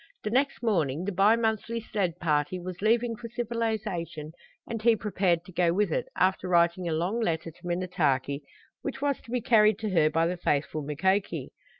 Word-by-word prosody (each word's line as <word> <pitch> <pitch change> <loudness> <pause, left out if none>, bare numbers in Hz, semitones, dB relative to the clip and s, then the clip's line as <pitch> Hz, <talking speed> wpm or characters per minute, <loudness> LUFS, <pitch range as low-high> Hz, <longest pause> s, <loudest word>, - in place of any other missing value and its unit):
The 210 - -2
next 260 -1 +1
morning 165 - +1
the 205 - -1
bi 200 +4 +5
monthly 230 0 -1
sled 195 -6 -2
party, 155 +1 0
was 180 0 -7
leaving 230 +2 +2
for 230 +1 -8
civilization, 220 - -3 0.4
and 230 -1 -4
he 230 0 +5
prepared 190 -5 0
to 185 - -12
go 170 -1 +2
with 200 -1 +1
it, - - -1
after 185 0 +1
writing 170 0 +3
a - - -1
long 175 +8 0
letter 165 -6 -1
to 170 +2 -12
Minnetaki, 160 -6 0 0.4
which 270 -1 -4
was 280 -1 0
to - - -18
be 245 0 -1
carried 215 -3 +4
to 215 -2 -3
her 160 -4 +4
by 165 +1 +2
the 180 +2 -1
faithful 155 -2 -1
Mukoki. 190 +8 -1
185 Hz, 190 wpm, -28 LUFS, 170-225 Hz, 0.4 s, bi